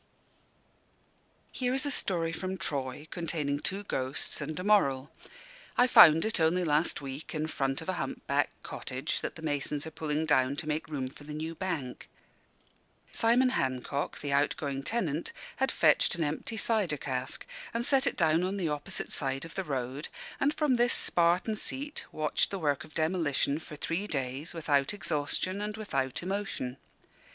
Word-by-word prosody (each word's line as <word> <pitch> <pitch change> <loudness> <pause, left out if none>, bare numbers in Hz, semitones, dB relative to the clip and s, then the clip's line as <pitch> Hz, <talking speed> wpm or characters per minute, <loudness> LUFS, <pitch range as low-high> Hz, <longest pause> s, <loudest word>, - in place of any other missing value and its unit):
Here 250 0 0
is 270 - +1
a 285 - 0
story 170 -9 0
from 185 +3 -3
Troy, 140 -2 -3
containing 150 -4 -1
two 195 +6 -2
ghosts 135 -5 -2
and 155 +3 -4
a - - -3
moral. 145 -10 +3 0.7
I 245 - +7
found 165 -9 +8
it, 220 -3 +1
only 165 +3 +3
last 155 0 +1
week, 135 +4 -6
in 155 0 0
front 135 -3 -1
of - - -6
a - - +1
hump 135 - -5
backed - - 0
cottage - - -3
that - - -4
the 160 - -10
masons 145 -1 -1
are 160 - -6
pulling 155 0 -1
down 140 -3 +3
to 150 - -3
make 150 -1 -1
room 135 -4 -2
for 140 +3 -12
the 150 0 -7
new 160 +2 -3
Bank. 165 -8 -4 1.0
Simon 245 +3 +4
Hancock, 135 - -2
the 145 -1 -2
outgoing 140 -1 +1
tenant, 165 -3 -2 0.2
had 265 0 +2
fetched 155 +1 +4
an 170 - -1
empty 155 +9 -3
cider 210 -10 +1
cask, 130 -2 -3 0.3
and 235 +1 -1
set 270 0 +4
it - - 0
down 165 -2 +4
on 190 +2 -1
the 175 -5 0
opposite 150 -1 -2
side 135 +1 -1
of 165 - -10
the 190 - -2
road; 135 -1 -3 0.3
and 285 +2 +2
from 290 -5 +2
this 240 0 +4
Spartan 175 +5 +3
seat 280 +7 -1
watched 155 -1 +1
the 195 - -3
work 145 -6 0
of 155 - -15
demolition 155 -3 +1
for 155 - -10
three 170 +7 -2
days, 135 +1 -3
without 145 0 +1
exhaustion 185 +3 -1
and 210 +1 -3
without 135 -12 -1
emotion. 190 -9 -3
155 Hz, 170 wpm, -30 LUFS, 140-190 Hz, 1.0 s, found